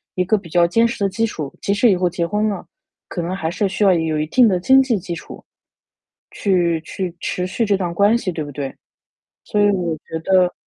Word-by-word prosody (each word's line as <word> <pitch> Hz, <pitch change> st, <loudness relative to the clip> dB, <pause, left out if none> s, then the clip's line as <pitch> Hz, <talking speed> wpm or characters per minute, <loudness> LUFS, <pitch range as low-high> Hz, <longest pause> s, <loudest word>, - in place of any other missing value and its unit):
一 185 Hz, -, +1 dB
个 215 Hz, +4 st, +2 dB
比 185 Hz, -4 st, -10 dB
较 175 Hz, +1 st, +4 dB
坚 230 Hz, +7 st, +3 dB
实 235 Hz, -3 st, -4 dB
的 195 Hz, -, +2 dB
基 225 Hz, +4 st, 0 dB
础， 155 Hz, -10 st, -5 dB
即 200 Hz, -, 0 dB
使 225 Hz, +2 st, +4 dB
以 185 Hz, -, +2 dB
后 180 Hz, 0 st, +1 dB
结 170 Hz, 0 st, -2 dB
婚 210 Hz, +3 st, 0 dB
了， 200 Hz, -4 st, -5 dB, 0.4 s
可 175 Hz, -, -3 dB
能 175 Hz, +2 st, -3 dB
还 160 Hz, -3 st, -3 dB
是 195 Hz, +4 st, 0 dB
需 200 Hz, -, -1 dB
要 195 Hz, -2 st, +6 dB
有 160 Hz, -2 st, 0 dB
一 150 Hz, -, 0 dB
定 240 Hz, +8 st, +5 dB
的 185 Hz, -, +2 dB
经 265 Hz, +9 st, +5 dB
济 250 Hz, -5 st, +1 dB
基 175 Hz, -1 st, -5 dB
础， -, -, -11 dB, 0.9 s
去 175 Hz, -4 st, +1 dB
去 180 Hz, +1 st, -5 dB
持 180 Hz, -, -2 dB
续 225 Hz, +4 st, -1 dB
这 205 Hz, -, +2 dB
段 175 Hz, -3 st, -3 dB
关 205 Hz, +6 st, +4 dB
系， 195 Hz, -6 st, -3 dB
对 165 Hz, -2 st, -4 dB
不 145 Hz, -, -8 dB
对？ 135 Hz, -1 st, -4 dB, 0.7 s
所 210 Hz, -, 0 dB
以 205 Hz, -, +5 dB
我 175 Hz, -4 st, -1 dB
觉 160 Hz, +2 st, -6 dB
得 185 Hz, -2 st, +3 dB
185 Hz, 260 characters per minute, -20 LUFS, 170-205 Hz, 0.9 s, 要